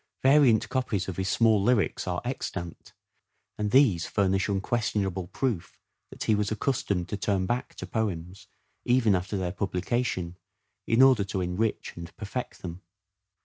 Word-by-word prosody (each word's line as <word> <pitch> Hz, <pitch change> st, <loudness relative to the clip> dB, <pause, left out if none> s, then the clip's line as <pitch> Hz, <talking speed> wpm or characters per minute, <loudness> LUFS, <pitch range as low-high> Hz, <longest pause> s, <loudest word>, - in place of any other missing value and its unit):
Variant 135 Hz, -5 st, +5 dB
copies 115 Hz, -8 st, -1 dB
of 95 Hz, -, -5 dB
his 95 Hz, 0 st, -1 dB
small 110 Hz, -1 st, +4 dB
lyrics 105 Hz, -3 st, +1 dB
are 90 Hz, -1 st, -1 dB
extant, 90 Hz, -9 st, -5 dB, 0.7 s
and 105 Hz, 0 st, 0 dB
these 110 Hz, -, +4 dB
furnish 95 Hz, -1 st, +1 dB
unquestionable 100 Hz, -2 st, -1 dB
proof 115 Hz, -4 st, -3 dB, 0.3 s
that -, -, -7 dB
he 110 Hz, -, +2 dB
was 105 Hz, -1 st, +1 dB
accustomed 105 Hz, -6 st, -1 dB
to 105 Hz, -, -3 dB
turn 95 Hz, -1 st, 0 dB
back 120 Hz, +6 st, -2 dB
to -, -, -6 dB
poems, 95 Hz, -4 st, -3 dB, 0.4 s
even 120 Hz, -4 st, +3 dB
after 95 Hz, +2 st, -1 dB
their 90 Hz, -2 st, -2 dB
publication, 95 Hz, -1 st, -2 dB, 0.5 s
in 115 Hz, +3 st, +5 dB
order 130 Hz, -6 st, +6 dB
to 95 Hz, -1 st, -3 dB
enrich 90 Hz, +5 st, -2 dB
and 85 Hz, -1 st, -9 dB
perfect 110 Hz, +4 st, -5 dB
them. 90 Hz, 0 st, -6 dB
100 Hz, 145 wpm, -27 LUFS, 90-115 Hz, 0.7 s, order